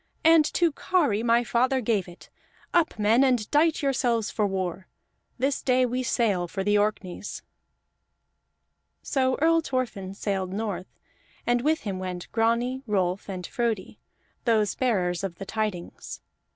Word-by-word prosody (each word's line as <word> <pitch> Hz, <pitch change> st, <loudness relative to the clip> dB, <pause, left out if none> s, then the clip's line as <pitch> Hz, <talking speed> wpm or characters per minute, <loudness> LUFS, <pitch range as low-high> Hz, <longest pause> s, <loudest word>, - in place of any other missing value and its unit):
"And 325 Hz, -1 st, +7 dB
to 340 Hz, -2 st, +3 dB
Kari 290 Hz, -, +1 dB
my 235 Hz, +1 st, +3 dB
father 255 Hz, +3 st, +1 dB
gave 215 Hz, -6 st, 0 dB
it! 175 Hz, 0 st, -14 dB, 0.4 s
Up, 340 Hz, -7 st, +2 dB
men, 220 Hz, +5 st, +4 dB
and 245 Hz, -5 st, +2 dB
dight 310 Hz, +1 st, +3 dB
yourselves 245 Hz, -5 st, +1 dB
for 210 Hz, -2 st, +1 dB
war! 185 Hz, -1 st, -3 dB, 0.5 s
This 270 Hz, +2 st, 0 dB
day 255 Hz, -1 st, +3 dB
we 250 Hz, +1 st, -1 dB
sail 215 Hz, -7 st, +1 dB
for 190 Hz, +3 st, -3 dB
the 205 Hz, +1 st, +2 dB
Orkneys." 205 Hz, -2 st, -2 dB, 1.6 s
So 260 Hz, -2 st, +1 dB
Earl 330 Hz, +2 st, +4 dB
Thorfinn 230 Hz, -10 st, -3 dB
sailed 195 Hz, -3 st, -2 dB
north, 205 Hz, -3 st, -3 dB, 0.6 s
and 240 Hz, 0 st, +2 dB
with 310 Hz, +4 st, +1 dB
him 195 Hz, -3 st, -4 dB
went 180 Hz, -1 st, -6 dB
Grani, 235 Hz, +3 st, +1 dB
Rolf, 190 Hz, -2 st, 0 dB
and 185 Hz, -2 st, -5 dB
Frodi, 230 Hz, -4 st, -2 dB, 0.5 s
those 215 Hz, -4 st, +2 dB
bearers 185 Hz, -8 st, 0 dB
of 190 Hz, -3 st, -3 dB
the 195 Hz, -, -8 dB
tidings. 210 Hz, -5 st, -4 dB
225 Hz, 140 wpm, -26 LUFS, 195-255 Hz, 1.6 s, And